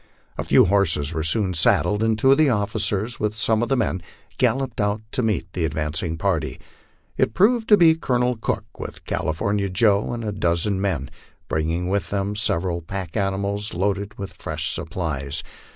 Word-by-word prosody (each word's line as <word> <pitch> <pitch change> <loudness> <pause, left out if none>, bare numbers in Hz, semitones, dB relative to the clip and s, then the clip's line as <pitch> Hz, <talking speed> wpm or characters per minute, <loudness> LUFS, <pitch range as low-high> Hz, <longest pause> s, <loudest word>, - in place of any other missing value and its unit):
A - - -3
few - - +5
horses 85 -6 +2
were 80 - -2
soon 90 +4 +2
saddled, 105 +5 +3
and 110 -1 +2
two 135 +5 +4
of 135 - +4
the 155 -2 +5
officers, 105 0 0
with 105 0 -2
some 110 0 +2
of 120 - -1
the 135 - +2
men, 105 -6 0 0.4
galloped 125 -1 +1
out 105 +1 0
to - - -1
meet 110 -6 -1
the 90 - -2
advancing 80 +2 -2
party. 85 -4 -1 0.6
It 110 - +1
proved 225 +4 +3
to 210 - +8
be 165 -3 +6
Colonel 125 -5 0
Cook, 110 - -4
with - - -8
California 100 +5 -1
Joe 100 +1 +2
and 120 -1 -4
a 105 - -1
dozen 95 0 0
men, 85 -9 -2 0.4
bringing 80 +3 -1
with 95 -3 -1
them 100 0 -2
several 85 -5 0
pack 90 0 -6
animals 100 +1 -1
loaded 100 +2 -1
with 100 -1 -6
fresh - - -3
supplies. 80 -3 -3
100 Hz, 175 wpm, -23 LUFS, 85-110 Hz, 0.6 s, to